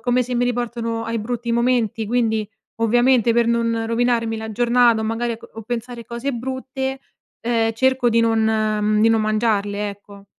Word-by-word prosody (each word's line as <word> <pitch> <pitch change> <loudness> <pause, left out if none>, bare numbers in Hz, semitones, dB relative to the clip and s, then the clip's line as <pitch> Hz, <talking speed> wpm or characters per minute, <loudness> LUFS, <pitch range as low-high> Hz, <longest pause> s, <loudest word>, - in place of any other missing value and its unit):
come 250 0 +1
se 250 +1 -4
mi 245 - +2
riportano 235 -2 -2
ai 230 0 -2
brutti 235 +2 -3
momenti 235 -2 +1
quindi, 220 -2 0 0.4
ovviamente, 240 0 +3
per 235 0 +2
non 230 -1 0
rovinarmi 230 -1 0
la 220 0 -6
giornata 240 0 +3
o 220 - -2
magari 230 +2 -1
a - - -5
co - - -14
o 225 - -7
pensare 240 +1 -5
cose 240 +4 -4
brutte, 265 +2 -4 0.4
ehm, 225 -1 +1
cerco 260 +1 +2
di 230 0 +3
non 225 -1 +2
mhmm, 215 -1 +1
di 225 - +5
non 225 -1 +3
mangiarle, 210 -2 0
ecco. 200 0 -12
230 Hz, 180 wpm, -21 LUFS, 220-245 Hz, 0.4 s, di